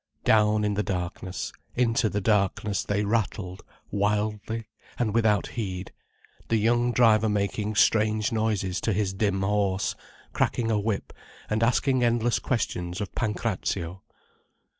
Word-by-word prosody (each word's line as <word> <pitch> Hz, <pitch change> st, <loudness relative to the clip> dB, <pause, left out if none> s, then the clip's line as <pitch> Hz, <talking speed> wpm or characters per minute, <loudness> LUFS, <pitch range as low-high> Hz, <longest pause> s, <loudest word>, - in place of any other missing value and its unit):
Down 105 Hz, -1 st, +4 dB
in 105 Hz, 0 st, +1 dB
the 105 Hz, -, 0 dB
darkness 90 Hz, -1 st, -4 dB, 0.2 s
into 115 Hz, -2 st, +2 dB
the 105 Hz, +1 st, -2 dB
darkness 100 Hz, 0 st, +1 dB
they 105 Hz, 0 st, 0 dB
rattled, 100 Hz, -3 st, -2 dB, 0.3 s
wildly, 105 Hz, +2 st, -1 dB, 0.3 s
and 110 Hz, -4 st, 0 dB
without 110 Hz, -3 st, +3 dB
heed, 95 Hz, -5 st, -4 dB, 0.6 s
the 115 Hz, -, +2 dB
young 120 Hz, +3 st, +2 dB
driver 110 Hz, -3 st, +4 dB
making 105 Hz, +1 st, -1 dB
strange 110 Hz, 0 st, +3 dB
noises 105 Hz, -5 st, 0 dB
to 110 Hz, -, +1 dB
his 95 Hz, -1 st, 0 dB
dim 95 Hz, -1 st, 0 dB
horse, 100 Hz, -1 st, +1 dB, 0.4 s
cracking 115 Hz, -2 st, 0 dB
a 105 Hz, -, +2 dB
whip 105 Hz, -1 st, -2 dB, 0.4 s
and 110 Hz, +1 st, +1 dB
asking 130 Hz, +2 st, +2 dB
endless 120 Hz, 0 st, +2 dB
questions 90 Hz, -7 st, -2 dB
of 105 Hz, -, -4 dB
Pancrazio. 95 Hz, -5 st, -2 dB
105 Hz, 130 wpm, -26 LUFS, 100-115 Hz, 0.6 s, Down